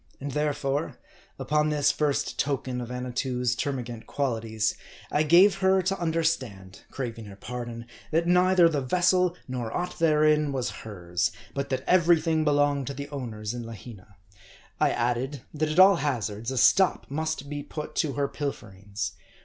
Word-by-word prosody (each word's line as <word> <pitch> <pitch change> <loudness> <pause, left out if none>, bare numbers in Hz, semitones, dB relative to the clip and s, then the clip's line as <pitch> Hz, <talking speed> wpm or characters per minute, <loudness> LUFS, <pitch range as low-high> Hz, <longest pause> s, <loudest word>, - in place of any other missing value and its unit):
And 140 +1 -5
therefore, 145 0 -1 0.4
upon 150 +1 +1
this 145 -1 +3
first 150 -2 -1
token 130 -3 -1
of 120 - -6
Annatoo's 125 0 -2
termagant 125 -5 -4
qualities, 110 -5 -1 0.4
I 150 - +2
gave 175 +6 +6
her 190 -1 +3
to 195 +1 -1
under 165 -1 0
stand 100 - -3
craving 115 -4 -5
her 100 -1 -10
pardon 120 +1 -6 0.2
that 165 +2 +1
neither 180 0 +5
the 150 -4 0
vessel 180 +4 +2
nor 125 -3 -4
aught 180 0 -4
therein 150 -2 +3
was 125 -2 -2
hers; 90 -5 -2 0.2
but 140 0 -3
that 130 -1 -2
every 175 -2 +5
thing 160 -1 +1
belonged 145 -2 +2
to 140 - -4
the 140 +2 -6
owners 115 -6 -5
in 120 -1 -5
Lahina. 110 -3 -11 0.6
I - - +4
added, 125 +3 -1
that 155 0 -1
at 155 - -3
all 190 0 +8
hazards, 115 -6 -2
a 130 - -3
stop 190 - +4
must 155 -1 -2
be 145 0 -4
put 150 +1 -7
to 145 -3 +1
her 140 -1 0
pilferings. 105 -9 -5
140 Hz, 160 wpm, -27 LUFS, 120-155 Hz, 0.6 s, all